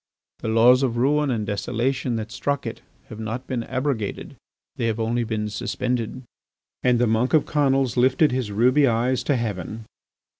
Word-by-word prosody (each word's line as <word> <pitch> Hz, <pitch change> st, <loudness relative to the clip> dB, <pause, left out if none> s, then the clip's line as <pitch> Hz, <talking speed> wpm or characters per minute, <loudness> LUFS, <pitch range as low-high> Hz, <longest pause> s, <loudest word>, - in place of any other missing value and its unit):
The -, -, -5 dB
laws 120 Hz, +3 st, +5 dB
of 120 Hz, -3 st, 0 dB
ruin 145 Hz, +4 st, +2 dB
and 115 Hz, -4 st, -1 dB
desolation 120 Hz, +4 st, -1 dB
that 110 Hz, 0 st, -4 dB
struck 140 Hz, +2 st, -2 dB
it 115 Hz, -, -6 dB, 0.3 s
have 110 Hz, -, -9 dB
not 110 Hz, +3 st, -4 dB
been 125 Hz, -2 st, -2 dB
abrogated, 130 Hz, -5 st, -3 dB, 0.4 s
they 115 Hz, -, -1 dB
have 110 Hz, 0 st, -1 dB
only 115 Hz, +2 st, 0 dB
been 110 Hz, -2 st, -2 dB
suspended." 125 Hz, +3 st, -3 dB, 0.6 s
And 125 Hz, -1 st, +3 dB
the 120 Hz, -, +3 dB
monk 115 Hz, +6 st, +2 dB
of 155 Hz, -, +3 dB
Conils 135 Hz, -4 st, +1 dB
lifted 130 Hz, +4 st, +4 dB
his 125 Hz, -4 st, -2 dB
ruby 125 Hz, +7 st, +4 dB
eyes 120 Hz, +2 st, +1 dB
to 145 Hz, -, +2 dB
heaven. 110 Hz, -1 st, -4 dB
120 Hz, 165 wpm, -23 LUFS, 110-130 Hz, 0.6 s, laws